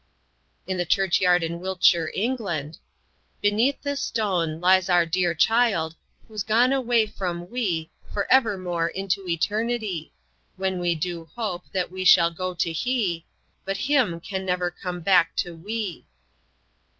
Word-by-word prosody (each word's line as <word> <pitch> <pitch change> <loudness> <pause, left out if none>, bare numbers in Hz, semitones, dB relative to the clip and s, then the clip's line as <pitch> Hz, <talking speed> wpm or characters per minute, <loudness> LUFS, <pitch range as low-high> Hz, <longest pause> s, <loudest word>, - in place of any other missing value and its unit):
In 185 -1 -3
a - - +2
church 190 +1 +2
yard 180 -1 +4
in 170 +1 -3
Wiltshire, 175 -3 +2
England: 195 - -2 0.6
"Beneath 225 +8 +1
this 285 -1 -2
stone 180 -8 -1
lies 185 +1 +4
our 175 -1 +4
dear 175 0 0
child 200 -6 +2 0.3
Whos' 215 -2 -5
gone 230 +6 +3
away 240 -4 +2
from 180 -4 -5
we 180 -10 -2 0.2
For 200 - -1
evermore 185 -9 +2
into 195 +1 -3
eternity; 205 0 -1 0.4
When 190 -1 -2
we 175 -1 +1
do 165 +1 -4
hope 205 -7 -3
that 185 -2 -2
we 185 0 -4
shall 170 -2 +6
go 185 +2 -4
to 170 -1 -1
he 180 -4 -1 0.4
But 195 0 -3
him 255 -9 +1
can 190 +2 -5
never 180 -1 -1
come 180 0 -6
back 175 -2 +3
to 175 -1 -2
we." 205 +1 -5
185 Hz, 145 wpm, -24 LUFS, 170-215 Hz, 0.6 s, shall